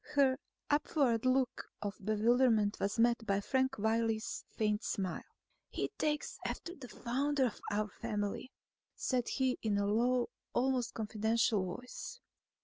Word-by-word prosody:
Her 270 -2 +4 0.3
upward 275 -5 +2
look 255 -1 +2
of 205 -1 -5
bewilderment 215 0 +3
was 200 +3 0
met 235 0 +4
by 200 -1 +2
Frank 260 +5 +1
Wiley's 220 +1 0
faint 210 0 0
smile. 190 -4 -2 0.5
"He - - -2
takes 300 -1 -1
after 345 - -4
the 255 -6 -10
founder 270 +3 0
of 240 - -3
our 210 +1 0
family," 210 +5 -3 0.4
said 250 -2 0
he 260 -2 +1
in 210 -2 +1
a 200 - +1
low, 240 +4 +2 0.2
almost 255 -1 +1
confidential 220 -1 +1
voice. 250 - -8
235 Hz, 135 wpm, -34 LUFS, 210-260 Hz, 0.5 s, Her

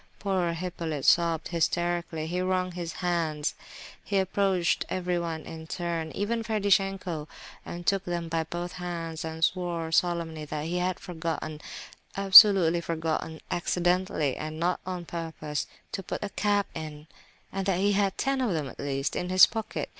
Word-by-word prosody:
Poor 185 -4 0
Hippolyte 165 -4 -4
sobbed 165 -2 +3
hysterically; 170 -1 0
he 180 +3 -2
wrung 185 0 0
his 175 -2 -5
hands; 160 -4 0 0.5
he 200 - -1
approached 190 -2 +1
everyone 175 -3 -2
in 160 0 -8
turn—even 175 +7 -2
Ferdishenko—and 195 -6 -2
took 195 -1 +2
them 175 -1 -2
by 165 0 0
both 175 +2 -4
hands, 170 -2 -5
and 160 0 -4
swore 170 -3 -2
solemnly 165 -2 0
that 150 0 -4
he 175 +2 -1
had 180 0 -1
forgotten—absolutely 175 +3 +4
forgotten—"accidentally, 165 0 -1
and 155 +1 -5
not 175 +2 +1
on 180 -2 -4
purpose,"—to 160 +2 -5
put 190 - -5
a 205 - -3
cap 205 0 +1
in—that 160 +5 -5
he 200 +2 +2
"had 195 -1 +1
ten 270 -1 0
of 235 -7 +1
them, 155 -4 -2
at - - -13
least, 135 -1 -2
in 180 - -2
his 185 0 +9
pocket." 220 -1 -4
175 Hz, 135 wpm, -28 LUFS, 160-185 Hz, 0.5 s, his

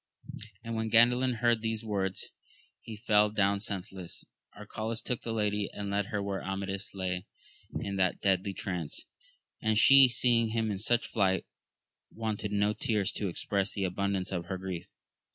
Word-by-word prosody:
And 115 - -5
when 110 0 -1
Oandalin 125 +3 +5
heard 120 -2 +3
these 110 0 -2
words, 95 -3 -2 0.5
he 110 -2 -9
fell 105 -1 +3
down 100 -1 +2
senseless. 95 -3 -5 0.3
Arcalaus 110 +2 -4
took 125 - -2
the 115 - -4
lady, 105 -2 0
and 100 -1 -5
led 100 0 0
her 105 -1 -2
where 100 -1 -3
Amadis 95 +1 -4
lay 90 0 -3 0.5
in 100 -1 -3
that 95 -1 +1
deadly 95 0 +1
trance; 90 -7 -4 0.6
and 110 -1 +2
she 135 +3 +9
seeing 120 -1 +3
him 110 -1 -1
in 100 - -3
such 115 +3 +1
plight, 95 -3 +2 0.6
wanted 110 -2 -3
no 105 +1 +2
tears 105 -3 0
to 105 - -2
express 100 +2 -1
the 100 - -2
abundance 95 0 -1
of 90 -3 -2
her 95 +2 -4
grief. 95 -2 -5
105 Hz, 160 wpm, -30 LUFS, 95-110 Hz, 0.6 s, she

